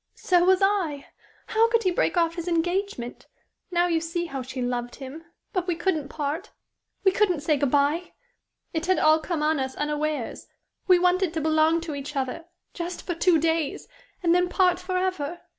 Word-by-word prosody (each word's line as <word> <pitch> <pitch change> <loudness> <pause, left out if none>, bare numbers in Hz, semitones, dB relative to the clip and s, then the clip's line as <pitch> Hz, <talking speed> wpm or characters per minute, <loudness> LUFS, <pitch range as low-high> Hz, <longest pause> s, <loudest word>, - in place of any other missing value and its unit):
So 355 -2 +2
was 375 +1 +4
I. 360 -8 +1 0.4
How 450 +1 +3
could 460 -1 +2
he 370 - +2
break 350 0 0
off 335 -1 +3
his 340 0 -6
engagement? 350 -6 -2 0.4
Now 350 -1 +2
you 335 -2 +1
see 335 +1 -2
how 275 -5 -5
she 255 +1 -7
loved 245 -1 -2
him. 285 +4 -9 0.3
But 365 -3 -1
we 350 - +1
couldn't 325 -5 -1
part 310 +7 -3 0.5
we 385 - +5
couldn't 370 -6 +1
say 310 0 +2
good 280 -1 +1
bye. 290 +5 +1 0.6
It 325 +1 -2
had 370 - +3
all 310 +1 +5
come 315 -1 -2
on 310 -1 +2
us 265 0 -3
unawares. 295 -3 -2 0.4
We 365 -1 +7
wanted 360 -1 +2
to 320 - 0
belong 315 +1 +3
to 325 -2 -5
each 285 +1 -6
other 270 +4 -3 0.3
just 350 0 -5
for 350 - -1
two 340 0 +3
days 320 -1 -1 0.4
and 340 -1 +4
then 360 0 +2
part 360 -1 +3
forever. 365 -3 -2
330 Hz, 185 wpm, -25 LUFS, 295-360 Hz, 0.6 s, We